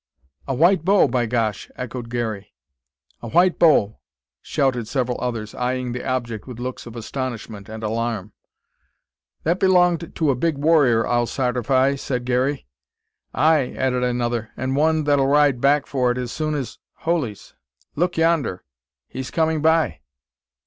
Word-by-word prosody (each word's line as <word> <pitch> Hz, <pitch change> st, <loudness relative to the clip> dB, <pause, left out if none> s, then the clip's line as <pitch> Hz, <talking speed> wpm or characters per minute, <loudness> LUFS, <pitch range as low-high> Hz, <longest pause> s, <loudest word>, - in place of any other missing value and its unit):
"A 135 Hz, -, -1 dB
white 170 Hz, +4 st, +4 dB
bow, 195 Hz, +3 st, +4 dB
by 120 Hz, -1 st, 0 dB
gosh!" 110 Hz, -3 st, -1 dB
echoed 125 Hz, -1 st, -6 dB
Garey. 110 Hz, -4 st, -4 dB, 0.7 s
"A -, -, -6 dB
white 175 Hz, +8 st, +3 dB
bow!" 140 Hz, -11 st, +4 dB, 0.4 s
shouted 125 Hz, -5 st, 0 dB
several 125 Hz, -1 st, -2 dB
others, 115 Hz, -4 st, -3 dB
eyeing 125 Hz, 0 st, -2 dB
the 125 Hz, +1 st, -5 dB
object 120 Hz, -4 st, -3 dB
with 125 Hz, -3 st, -8 dB
looks 125 Hz, 0 st, -5 dB
of 115 Hz, -, -10 dB
astonishment 115 Hz, -4 st, -6 dB
and 110 Hz, 0 st, -7 dB
alarm. 110 Hz, -2 st, -2 dB, 1.1 s
"That 170 Hz, +4 st, +1 dB
belonged 180 Hz, -3 st, +2 dB
to 155 Hz, -4 st, +2 dB
a -, -, 0 dB
big 160 Hz, +3 st, 0 dB
warrior, 140 Hz, -7 st, +3 dB
I'll 120 Hz, -1 st, +1 dB
sartify," 130 Hz, +2 st, +1 dB
said 125 Hz, -3 st, -3 dB
Garey. 130 Hz, +3 st, 0 dB, 0.7 s
"Ay," 155 Hz, -4 st, +2 dB
added 125 Hz, -1 st, 0 dB
another, 120 Hz, -2 st, -1 dB
"an' 130 Hz, +1 st, -2 dB
one 155 Hz, +2 st, +2 dB
that'll 145 Hz, -2 st, +2 dB
ride 145 Hz, -3 st, +3 dB
back 140 Hz, +1 st, +3 dB
for 125 Hz, -3 st, 0 dB
it 120 Hz, -, -3 dB
as 125 Hz, -2 st, -4 dB
soon 155 Hz, +1 st, -2 dB
as 135 Hz, -4 st, -5 dB, 0.2 s
holies! 155 Hz, -, -2 dB, 0.4 s
look 175 Hz, +3 st, 0 dB
yonder! 165 Hz, -, +1 dB, 0.4 s
he's 130 Hz, 0 st, -6 dB
coming 160 Hz, -1 st, 0 dB
by 160 Hz, +1 st, +2 dB
130 Hz, 150 wpm, -22 LUFS, 120-150 Hz, 1.1 s, white